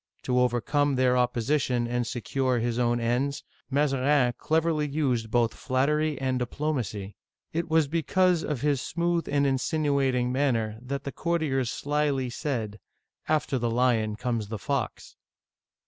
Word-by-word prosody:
To 125 0 +1
overcome 135 +4 +1
their 125 -1 +3
opposition 125 0 +1
and 120 0 -1
secure 130 +1 -1
his 120 +1 -1
own 120 0 +2
ends, 125 +4 -1 0.3
Mazarin 135 -2 +2
cleverly 160 -1 +1
used 130 -6 0
both 120 0 +2
flattery 150 +3 0
and 130 -1 0
diplomacy. 120 -7 -3 0.4
It 165 +1 -2
was 160 -2 +3
because 170 +3 +2
of 145 -5 -3
his 145 -3 +1
smooth 170 0 -1
and 140 0 +2
insinuating 135 -2 +1
manners 120 -5 0
that 135 +2 -4
the 140 - -4
courtiers 145 -7 0
slyly 145 -3 -1
said, 115 -7 -3 0.5
"After 150 -4 +1
the 120 0 0
lion 115 -3 +1
comes 115 -2 -2
the 110 +1 -4
fox." 140 +2 -3
130 Hz, 135 wpm, -27 LUFS, 120-150 Hz, 0.5 s, their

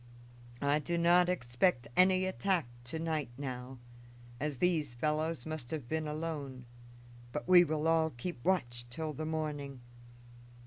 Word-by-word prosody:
I 145 +1 +3
do 170 +4 -2
not 175 +1 +5
expect 125 -3 +1
any 185 0 +5
attack 185 -2 +1 0.2
to 130 +6 -3
night 160 -4 -1
now, 130 -2 -5 0.6
as 150 -2 -2
these 155 -6 +1
fellows 155 +1 -1
must 155 -6 -5
have 150 -7 -4
been 160 +1 -1
alone; 150 -5 -4 0.7
but 150 +5 -4
we 180 -1 +9
will 155 -1 0
all 165 -1 +4
keep 120 +1 -6
watch 120 -10 0
till 155 +5 -4
the 155 +3 -4
morning. 145 -4 -3
155 Hz, 140 wpm, -33 LUFS, 135-165 Hz, 0.7 s, we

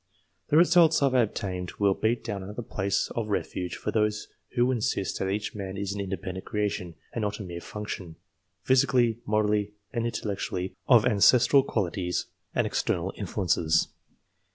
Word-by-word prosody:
The 150 - +4
results 165 -2 +5
I - - +6
have 135 - +1
obtained 100 -7 -1
will 100 -1 +3
beat 110 +4 0
down 105 -4 -4
another 105 +5 -6
place 100 -2 -1
of 115 -2 -2
refuge 90 -3 -2
for - - -3
those 105 -1 0 0.3
who 125 +1 +3
insist 115 -5 -1
that 95 - -1
each 105 +2 -2
man 95 -2 -5
is 100 0 -2
an 100 - -3
independent 95 -1 -5
creation, 100 -5 -2 0.2
and 115 - -2
not 105 0 -2
a - - -4
mere 85 -2 -7
function, 100 -5 -6 0.5
physically, 125 -3 +3
morally, 105 -1 +1 0.2
and 115 -1 0
intellectually, 100 -4 -3
of 120 -4 +6
ancestral 125 +4 +5
quali 100 -9 -1
ties 90 -2 -2 0.3
and - - +2
external - - -1
influences. 80 -3 +1
105 Hz, 160 wpm, -27 LUFS, 95-120 Hz, 0.5 s, I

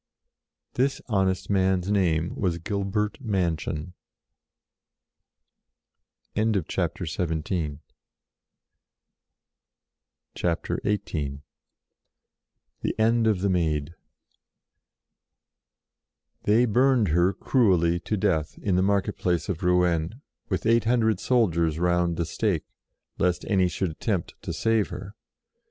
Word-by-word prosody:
This 135 +2 +1
honest 95 -5 0
man's 95 -1 +1
name 85 -5 +1
was 90 -4 -1
Gilbert 100 - -2
Manchon. 85 -5 -2 2.4
CHAPTER 95 -5 0
XVIII 80 -2 -2 2.6
THE 85 -4 -2 1.6
END 115 +1 +3
OF 105 -5 +2
THE 100 - +1
MAID 80 -3 0 2.5
THEY 110 +4 +4
burned 125 -2 +3
her 85 +4 +3
cruelly 90 -7 +2
to 105 - -2
death 80 -5 0
in 95 -3 0
the 90 - +3
market 100 0 +1
place 90 -2 0
of 95 -1 -2
Rouen, 90 +2 +1 0.3
with - - -2
eight 115 0 +3
hundred 110 -4 +2
soldiers 85 -10 +2
round 85 -1 +1
the 85 - 0
stake, 90 -1 -1 0.5
lest 90 -1 +1
any 95 -3 +2
should 90 0 -2
attempt 90 +2 -2
to - - -5
save 115 -2 +1
her. 100 0 -8
95 Hz, 95 wpm, -26 LUFS, 85-105 Hz, 2.6 s, THEY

